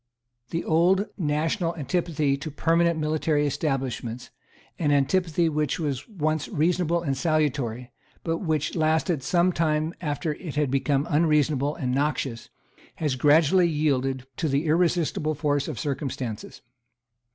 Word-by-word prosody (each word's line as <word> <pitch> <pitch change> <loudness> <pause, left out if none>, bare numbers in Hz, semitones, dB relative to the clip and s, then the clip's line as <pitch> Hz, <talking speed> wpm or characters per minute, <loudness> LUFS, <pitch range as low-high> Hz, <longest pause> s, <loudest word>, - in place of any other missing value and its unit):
The 165 - -2
old 180 +5 +3
national 165 +2 -1
antipathy 155 -3 0
to 140 +3 -6
permanent 165 +2 +2
military 155 -1 +1
establishments, 130 -5 -3 0.5
an 150 -3 +1
antipathy 165 +4 +2
which 150 -1 -1
was 145 - -3
once 155 -6 -1
reasonable 170 +1 +1
and 140 -4 -1
salutary, 135 -5 -1 0.3
but 165 -1 -1
which 155 -5 -1
lasted 160 -1 +1
some 175 +7 +2
time 155 -1 0
after 150 0 -2
it 155 -1 -8
had 150 -3 +1
become 135 +1 +1
unreasonable 150 -2 +2
and 125 -5 -2
noxious, 135 -4 -1 0.5
has 150 -4 -1
gradually 160 +6 +4
yielded 135 -4 0
to 165 - 0
the 140 +3 0
irresistible 160 -1 +1
force 145 -1 0
of 150 - -5
circumstances. 130 -6 -4
150 Hz, 130 wpm, -25 LUFS, 140-165 Hz, 0.5 s, gradually